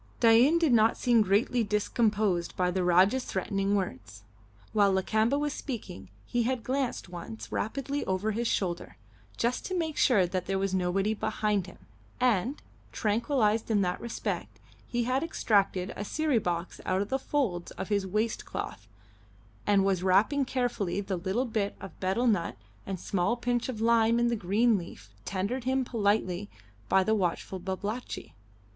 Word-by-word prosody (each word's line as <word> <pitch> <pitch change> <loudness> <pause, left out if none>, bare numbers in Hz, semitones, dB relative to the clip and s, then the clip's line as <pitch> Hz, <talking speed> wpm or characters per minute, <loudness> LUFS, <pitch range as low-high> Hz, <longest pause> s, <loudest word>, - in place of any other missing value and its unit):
Dain 235 +8 +6
did 325 -6 +3
not 225 0 +4
seem 240 -3 +4
greatly 215 +4 +2
discomposed 210 -3 0
by 180 -1 +2
the 185 0 0
Rajah's 185 +8 +4
threatening 195 +1 -1
words. 115 - -4 0.5
While 205 -2 +4
Lakamba 220 +7 +2
was 295 -1 -1
speaking 205 - -6 0.2
he 240 - 0
had 245 0 -1
glanced 265 -4 -2
once 110 - -8
rapidly 275 +5 -2
over 190 +3 0
his 230 +3 -1
shoulder, 175 -5 -2 0.4
just 240 +2 0
to 370 - -2
make 320 -3 -2
sure 205 -8 +4
that 180 0 -3
there 195 0 0
was 195 0 -1
nobody 190 +3 +1
behind 210 -3 -1
him, 180 - -12 0.4
and, 250 +2 +1 0.3
tranquillised 225 0 +1
in 210 -2 +3
that 180 0 -2
respect, 235 0 -4 0.3
he 240 0 -1
had 255 +3 +1
extracted 200 - +1
a 205 - -4
siri 295 +2 +1
box 175 -2 -3
out 185 +2 +1
of 205 - -10
the 265 - 0
folds 235 -12 -1
of 190 - -6
his 200 -2 0
waist 215 +4 -1
cloth, 100 +2 -6 0.8
and 200 -2 +4
was 190 -2 +1
wrapping 205 +10 +3
carefully 245 -8 -1
the 195 -1 -2
little 190 +8 -1
bit 220 -4 -2
of 195 -1 -10
betel 195 +6 0
nut 205 -8 +1 0.3
and 195 -1 -3
a - - -14
small 195 +5 0
pinch 240 +1 -1
of 235 -4 -4
lime 230 0 +4
in 240 0 +3
the 235 - +1
green 215 +3 +2
leaf 110 - -11
tendered 200 +7 -2
him 260 0 +1
politely 205 -4 0 0.4
by 190 - +4
the 220 - +1
watchful 190 -1 -1
Babalatchi. 200 +6 -5
210 Hz, 165 wpm, -29 LUFS, 190-240 Hz, 0.8 s, Dain